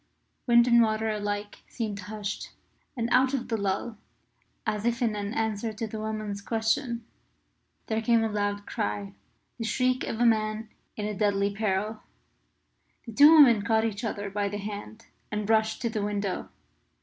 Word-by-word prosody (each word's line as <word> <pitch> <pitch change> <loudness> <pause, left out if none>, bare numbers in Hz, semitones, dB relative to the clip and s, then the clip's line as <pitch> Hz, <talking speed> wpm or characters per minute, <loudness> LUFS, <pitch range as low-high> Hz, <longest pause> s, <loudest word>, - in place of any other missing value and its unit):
Wind 235 0 +6
and 235 -1 +6
water 220 0 +1
alike 205 0 -3
seemed 215 -4 -4
hushed. 205 +1 -5 0.5
And 230 -1 0
out 260 +2 +4
of 250 -1 -4
the 230 - +1
lull, 200 +2 -2 0.7
as 210 -2 -1
if 235 +1 0
in 230 -4 +1
answer 215 +1 -2
to 220 +2 -4
the 220 0 -6
woman's 215 -2 -4
question, 230 +2 -1 0.8
there 220 0 -1
came 230 0 +3
a 220 - -1
loud 205 -1 -1
cry 100 -1 -3 0.5
the - - -2
shriek 255 +3 +1
of 225 - -4
a 240 - +4
man 215 -1 +1 0.3
in 210 0 -3
deadly 200 -1 +1
peril. 210 +1 -1 1.0
The 230 - -8
two 290 +7 +8
women 270 -9 +7
caught 220 +2 +2
each 210 -1 -3
other 205 -3 -3
by 200 0 -1
the 205 - -4
hand 210 +2 -7 0.3
and 210 -1 -2
rushed 220 +1 +2
to 235 - +1
the 215 -2 -2
window. 200 -2 -2
215 Hz, 160 wpm, -27 LUFS, 205-230 Hz, 1.0 s, two